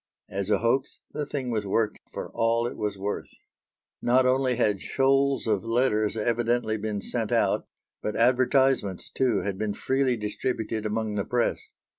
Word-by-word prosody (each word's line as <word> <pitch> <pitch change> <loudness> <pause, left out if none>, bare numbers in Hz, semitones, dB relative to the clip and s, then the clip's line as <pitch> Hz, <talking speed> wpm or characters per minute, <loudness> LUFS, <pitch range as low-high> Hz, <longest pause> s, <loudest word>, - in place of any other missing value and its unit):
As 100 0 -3
a - - +4
hoax 125 +4 0
the 150 -1 -3
thing 130 -4 -3
was 105 -3 -1
worked 110 +2 0
for - - -6
all 115 +1 +2
it 120 - -3
was 105 -2 -3
worth. 100 +2 -3 0.7
Not 125 +2 +4
only 130 0 +2
had 105 -5 +1
shoals 135 0 +2
of 105 -4 +1
letters 115 -2 +1
evidently 120 0 +1
been 105 -1 -3
sent - - -3
out, - - +2 0.3
but 105 - -3
advertisements, 125 -4 +2
too, 125 -6 +1
had 100 -1 -3
been 105 -2 -1
freely 130 0 +1
distributed 110 0 -2
among 110 0 -2
the 100 - +1
press. 120 +1 0
115 Hz, 160 wpm, -26 LUFS, 105-130 Hz, 0.7 s, a